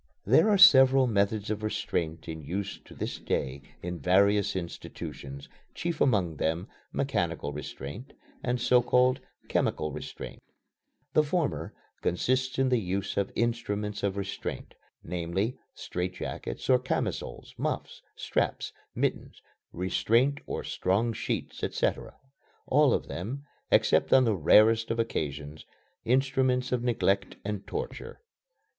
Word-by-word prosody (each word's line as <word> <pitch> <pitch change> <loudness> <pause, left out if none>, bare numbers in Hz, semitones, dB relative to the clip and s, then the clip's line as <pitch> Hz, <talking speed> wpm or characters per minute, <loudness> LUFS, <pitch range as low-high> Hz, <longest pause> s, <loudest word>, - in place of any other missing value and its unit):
There 135 - +5
are 205 - +5
several 135 -6 +8
methods 105 -2 +1
of 110 0 -2
restraint 85 -6 -2
in 80 -1 -5
use 95 +6 -4
to - - -13
this - - -4
day 70 +1 -2 0.2
in 90 0 -4
various 100 +5 +3
institutions, 70 -5 -6 0.3
chief 170 -2 -3
among 95 - +2
them 80 +4 -1 0.2
"mechanical 70 - -1
restraint" 75 - -7 0.3
and 125 0 0
so 125 0 +4
called 125 +2 +3 0.3
"chemical 75 0 0
restraint." - - -8 0.7
The - - +6
former 155 +1 -1 0.3
consists 130 +8 0
in 135 0 +3
the 125 -2 +3
use 95 0 -2
of 100 -1 0
instruments 105 -3 -1
of 100 -1 -1
restraint, 100 -1 -5 0.3
namely, 90 +7 -2 0.2
strait 90 +1 -4
jackets - - -5
or 130 -1 +5
camisoles, 130 - -3
muffs, - - -3
straps, - - -1 0.2
mittens, - - -2 0.3
restraint 115 +10 +2
or - - -3
strong 105 +5 0
sheets, - - -4
etc. - - -1 0.5
all - - +4
of - - -3
them, 125 +11 -5 0.2
except - - +3
on 130 - +7
the 115 -3 +2
rarest 110 +7 +5
of 115 - -1
occasions, 75 -9 -3 0.4
instruments 130 0 +2
of 125 -2 +1
neglect 100 -5 +1
and 105 -1 -4
torture. 475 +2 -5
105 Hz, 125 wpm, -29 LUFS, 90-125 Hz, 0.7 s, several